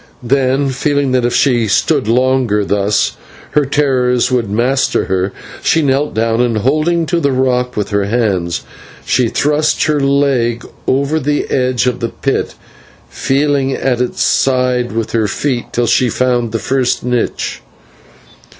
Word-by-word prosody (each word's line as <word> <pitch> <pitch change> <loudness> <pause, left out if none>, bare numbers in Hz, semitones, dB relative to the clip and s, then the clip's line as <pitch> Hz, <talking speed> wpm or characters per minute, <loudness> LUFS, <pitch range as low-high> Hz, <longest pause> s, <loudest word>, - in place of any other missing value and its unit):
Then, 135 +2 +1
feeling 140 +1 0
that 125 -1 +1
if 120 - 0
she 120 -5 +2
stood 135 +4 +1
longer 125 -3 +1
thus, 100 +1 0 0.3
her 150 -1 +2
terrors 130 -4 +1
would 120 -5 0
master 125 +6 +1
her, 95 0 -1 0.3
she 160 - +2
knelt 140 +1 0
down, 115 +1 +1
and, 120 -3 +1
holding 155 +8 +1
to 170 +2 0
the 140 -4 +1
rock 125 -1 0
with 105 +1 -2
her 100 -1 +1
hands, 100 -6 -1 0.4
she 125 -2 +2
thrust 150 +5 +1
her 150 -1 +1
leg 135 -4 +1 0.2
over 140 +4 +1
the 145 0 -1
edge 125 -1 +1
of 125 -1 -1
the 115 -2 -2
pit, - - -2 0.5
feeling 140 -1 0
at 125 -2 -1
its 125 - -1
side 125 -2 +1
with 115 0 -3
her 110 -2 +1
foot 125 +3 -2
till 120 - 0
she 120 +2 +2
found 120 -1 0
the 115 - -1
first 130 +3 -1
niche. 125 -1 -2
125 Hz, 150 wpm, -15 LUFS, 115-140 Hz, 0.5 s, she